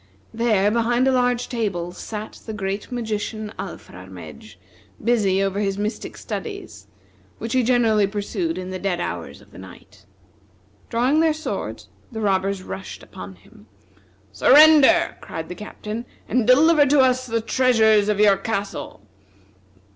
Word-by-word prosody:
There, 215 -3 +2
behind 240 +3 +1
a - - +4
large 245 -1 +1
table, 195 -8 -3
sat 215 +3 -8
the 220 - -4
great 200 +2 -4
magician, 215 -2 -4
Alfrarmedj, 90 - -10 0.5
busy 205 -5 +2
over 195 0 -1
his 195 -1 -1
mystic 210 +2 -4
studies, - - -7 0.5
which 230 - -5
he 260 - +3
generally 225 -4 +3
pursued 195 -4 -3
in 185 0 -6
the 185 - -5
dead 185 -3 -2
hours - - -5
of - - -21
the - - -13
night. - - -15 0.8
Drawing 250 +6 +2
their 320 -1 +3
swords, 315 - -5 0.2
the 225 - -6
robbers 195 -2 0
rushed 190 - -8
upon 95 +1 -10
him. 100 +3 -20 0.6
"Surrender!" 310 +3 +6
cried 160 0 -7
the - - -5
Captain, 210 +4 -7 0.2
"and 240 -3 0
deliver 290 +3 +5
to 280 0 +4
us 255 0 +2
the 230 -1 0
treasures 220 -3 +3
of 210 -1 0
your 205 -2 +5
castle." 200 - -4
215 Hz, 140 wpm, -22 LUFS, 195-245 Hz, 0.8 s, Surrender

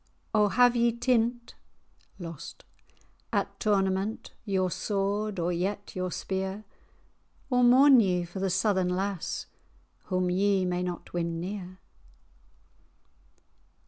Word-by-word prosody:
O 210 -1 +4
have 245 +3 +4
ye 235 0 +3
tint[#] 235 0 0 1.8
at - - -2
tournament 195 0 0
Your 190 -3 0
sword, 200 +2 -1
or 175 +1 0
yet 200 +4 -3
your 185 -1 -2
spear? 190 +3 -4 0.9
Or 250 0 +3
mourn 260 +2 +7
ye 180 -5 +1
for 180 +3 -8
the 195 0 0
Southern 190 0 +1
lass, 190 0 -2 0.6
Whom 185 -1 0
ye 195 0 +2
may 180 0 -1
not 180 -1 -5
win 170 -1 -2
near?" 185 0 -6
195 Hz, 110 wpm, -28 LUFS, 185-215 Hz, 1.8 s, mourn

